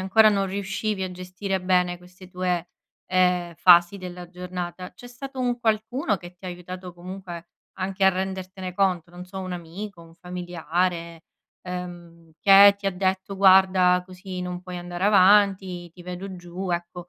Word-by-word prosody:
ancora 215 +4 +5
non 200 -2 +2
riuscivi 200 +1 -3
a 185 - -3
gestire 185 +1 -4
bene 180 -1 +2
queste 180 +1 -16
tue, 180 -1 -2 0.4
ehm, 180 -2 +1
fasi 175 +2 +6
della 180 -2 -8
giornata, 180 0 -6
c'è 245 +7 -13
stato 260 +2 -8
un 245 -1 0
qualcuno 220 0 0
che 175 0 -12
ti 190 - -18
ha - - -4
aiutato 180 +1 -8
comunque 175 -1 -8 0.3
anche 190 +1 -1
a 190 - +7
rendertene 190 0 -5
conto? 180 -3 +1
Non 175 +1 -9
so, 190 +1 -9
un 185 -1 -5
amico, 175 +2 -7
un 165 0 -16
familiare, 175 -1 -3 0.4
ehm, 175 -2 -8
che 200 +2 +8
ti 200 - -22
ha - - +3
detto: 190 +1 -1
"Guarda, 185 -2 +5
così 185 0 -7
non 180 0 -5
puoi 180 -1 -8
andare 175 +1 -4
avanti, 190 -3 +4
ti 175 +2 -14
vedo 180 +2 -7
giù", 180 +1 -6
ecco 175 0 -4
185 Hz, 160 wpm, -25 LUFS, 175-195 Hz, 0.4 s, che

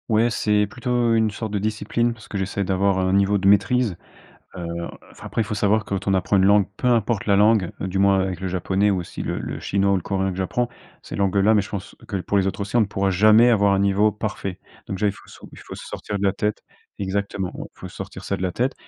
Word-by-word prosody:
Ouais, 115 +2 +3
c'est 105 -2 +1
plutôt 120 +1 0
une 110 -1 +2
sorte 110 +1 -5
de 105 - 0
discipline, 110 +3 -1
parce 110 -2 -15
que 100 - -5
j'essaie 100 +1 -2
d'avoir 95 +1 +1
un 95 0 +1
niveau 100 +1 +3
de 95 0 0
maîtrise, 110 +1 +3 0.6
heu 90 -2 -5 0.4
enfin, - - -13
après - - -1
il - - +2
faut 105 - -4
savoir, 105 +1 +2
quand 100 -1 -4
on 100 - +3
apprend 95 +1 +2
une 95 - +4
langue, 100 0 +5
peu - - -1
importe 115 -3 +1
la 100 - +3
langue, 105 -3 +3
heu, - - -2
du 95 +1 -3
moins 100 0 +4
avec 95 -2 -2
le 95 - -2
japonais, 95 +3 +1
ou 95 - 0
aussi 85 - -7
le - - -3
le - - -5
chinois 100 0 +1
ou - - +3
le 95 - -1
coréen 95 -1 -1
que 90 - -7
j'apprends, 120 +6 -1 0.3
ces - - -8
langues-là 100 +2 +3
mais 105 - +4
je 100 - -10
pense 100 -1 -6
que 100 - -3
pour 100 +2 -1
les 95 - +2
autres 95 - -3
aussi, 100 +3 -5
on 120 - +5
ne - - +3
pourra 100 -1 -1
jamais 110 +5 +6
avoir 100 -4 +4
un 100 - +2
niveau 100 +2 +3
parfait. 105 -3 -5 0.3
Donc 95 - -4
déjà 105 +2 +1
il 100 - 0
faut - - -17
so - - -13
il - - -13
faut - - -10
se - - -10
sortir 100 -1 -5
de - - -3
la 95 - +2
tête 105 0 -2 0.4
exactement, 100 -1 -2
il - - -6
faut - - -7
sortir - - -9
ça - - -1
de - - -8
la 90 - 0
tête, 125 +8 0
100 Hz, 265 wpm, -22 LUFS, 95-110 Hz, 0.6 s, jamais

